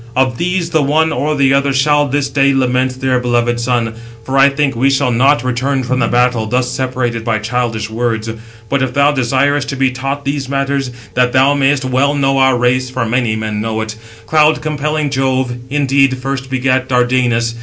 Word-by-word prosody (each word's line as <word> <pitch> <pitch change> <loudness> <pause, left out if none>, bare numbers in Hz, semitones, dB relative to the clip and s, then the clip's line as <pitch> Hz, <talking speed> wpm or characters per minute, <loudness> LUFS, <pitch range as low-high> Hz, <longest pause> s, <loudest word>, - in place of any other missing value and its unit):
Of 130 -2 +1
these 175 -1 -1
the 160 -2 +2
one 155 +3 +1
or 150 +1 -1
the 135 -1 +3
other 140 0 +2
shall 145 +2 +2
this 140 0 -1
day 140 -1 +2
lament 130 0 0
their 130 -1 +1
beloved 120 -1 0
son; 120 -2 -1 0.3
for 130 +4 -4
I 135 +1 +6
think 140 -2 -1
we 130 +4 +2
shall 135 -2 +1
not 130 +2 +2
return 130 +2 -1
from 130 +1 -1
the - - +1
battle 120 -2 +1
thus 125 +2 -1
separated 125 -3 -2
by 115 -1 0
childish 115 -1 -2
words. 110 0 -2 0.4
But 140 +3 0
if 130 -1 -2
thou 140 +1 +4
desirest 135 +1 0
to 140 - -3
be 135 -1 +1
taught 135 +2 -4
these 140 -1 -3
matters, 140 -1 -1 0.2
that 125 0 +1
thou 135 +2 +4
mayest 140 -1 +1
well 135 +3 +1
know 135 -1 +1
our 130 -1 +3
race 125 +1 +1
(for 125 -2 -2
many 115 -1 0
men 110 -1 -3
know 110 0 -2
it), 110 0 -5 0.3
cloud 155 +3 +3
compelling 150 -1 -2
Jove 130 -2 0
indeed 135 -2 +2
first 135 0 -4
begat 130 0 0
Dardanus. 125 -2 +1
130 Hz, 195 wpm, -15 LUFS, 125-140 Hz, 0.4 s, I